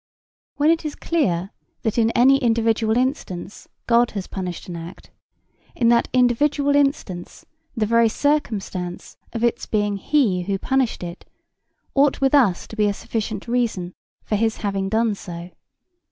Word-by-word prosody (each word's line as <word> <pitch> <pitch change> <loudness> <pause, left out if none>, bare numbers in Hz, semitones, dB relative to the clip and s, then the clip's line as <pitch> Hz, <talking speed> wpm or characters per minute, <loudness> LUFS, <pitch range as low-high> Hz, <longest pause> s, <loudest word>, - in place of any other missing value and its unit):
When 295 +2 +4
it 335 0 0
is 305 -1 -4
clear 195 - 0 0.3
that 220 +1 0
in 225 -1 +3
any 270 +3 +6
individual 225 -2 +2
instance 230 - -3 0.2
God 235 0 +4
has 190 - -3
punished 180 -3 -6
an 175 - -6
act, 170 +2 -10 0.6
in 235 -2 +3
that 235 0 +4
individual 280 +4 +2
instance 275 - -1 0.3
the 220 - +2
very 230 +1 +4
circumstance 210 -11 -2 0.2
of 230 -1 -4
its 235 - 0
being 205 -1 0
he 210 -6 +1
who 195 +2 -1
punished 260 -1 0
it 175 +1 -7 0.7
ought 280 0 +3
with 270 0 +2
us 235 -11 +3
to - - -8
be 210 -1 +2
a 205 - +1
sufficient 215 -1 -4
reason 230 -7 -1 0.3
for 215 - -1
his 225 +1 0
having 195 -1 -1
done 220 +1 +2
so. 175 -2 -8
225 Hz, 155 wpm, -22 LUFS, 195-255 Hz, 0.7 s, any